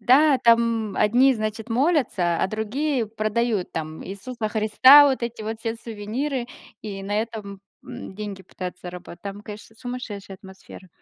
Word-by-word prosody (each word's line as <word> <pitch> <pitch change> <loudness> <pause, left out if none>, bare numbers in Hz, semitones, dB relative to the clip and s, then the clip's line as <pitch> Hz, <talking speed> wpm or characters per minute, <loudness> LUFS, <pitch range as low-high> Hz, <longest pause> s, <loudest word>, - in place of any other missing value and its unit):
да, 270 +5 +5
там 230 -3 +2
одни, 250 +5 +4
значит, 215 +1 -4
молятся, 240 - +1
а - - +3
другие 235 +4 -1
продают 215 -1 -1
там 155 0 -5
Иисуса 215 +4 -5
Христа, 255 +7 +7
вот 260 -2 -1
эти 235 -2 -4
вот 220 +1 -4
все 225 0 -2
сувениры, 235 +4 -4 0.4
и 200 -2 -6
на 205 +1 -2
этом, 210 -4 -7 0.2
м, - - -9
деньги 200 -2 -6
пытаются 180 0 -8
заработать. 180 -1 -9
Там, 200 0 -6
конечно, 210 +1 -10
сумасшедшая 230 -6 -7
атмосфера. 190 -1 -13
220 Hz, 145 wpm, -24 LUFS, 200-240 Hz, 0.4 s, Христа